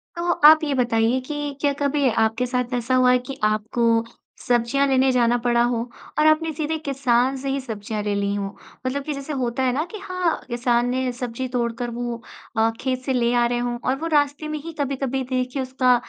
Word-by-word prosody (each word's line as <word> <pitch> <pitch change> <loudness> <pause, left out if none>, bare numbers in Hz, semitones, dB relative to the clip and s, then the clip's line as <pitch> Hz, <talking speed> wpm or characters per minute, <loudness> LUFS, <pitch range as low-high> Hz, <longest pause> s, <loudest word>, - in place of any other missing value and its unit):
तो 345 +1 0 0.2
आप 315 0 +6
ये 290 - 0
बताइए 240 -1 +2
कि 290 +2 -4
क्या 285 - +3
कभी 285 -1 +2
आपके 225 +2 +1
साथ 250 0 -2
ऐसा 245 +1 0
हुआ 255 0 +5
है 250 - +4
कि 275 - -6
आपको 225 +2 +2 0.4
सब्ज़ियाँ 245 +3 +2
लेने 265 0 +3
जाना 240 -1 +3
पड़ा 240 -1 +3
हो 240 0 +1 0.4
और 305 - +5
आपने 315 +1 +3
सीधे 310 +1 -2
किसान 265 -2 +2
से 270 +1 -4
ही 275 +1 0
सब्ज़ियाँ 215 -3 -5
ले 205 - -1
ली 200 0 0
हों? 200 -1 -2 0.4
मतलब 275 +2 -1
कि 300 - -3
जैसे 275 +2 -5
होता 260 -1 -1
है 255 - +2
ना 290 +4 0
कि 430 - -6
हाँ, 365 -3 -1
किसान 240 0 +1
ने 255 0 0
सब्ज़ी 245 +1 -4
तोड़ 240 -2 -1
कर 245 -1 -2
वो 235 0 -4 0.4
अ, 225 +1 +4
खेत 255 -1 -1
से 265 - 0
ले 240 -1 +2
आ 240 0 +4
रहे 240 0 -1
हों 240 0 -2
और 260 - +2
वो 330 - -3
रास्ते 290 +1 +1
में 305 0 -3
ही 330 0 -7
कभी-कभी 270 -1 -1
देखिए 255 +1 -1
उसका 255 -1 +2
255 Hz, 215 wpm, -23 LUFS, 240-275 Hz, 0.4 s, आप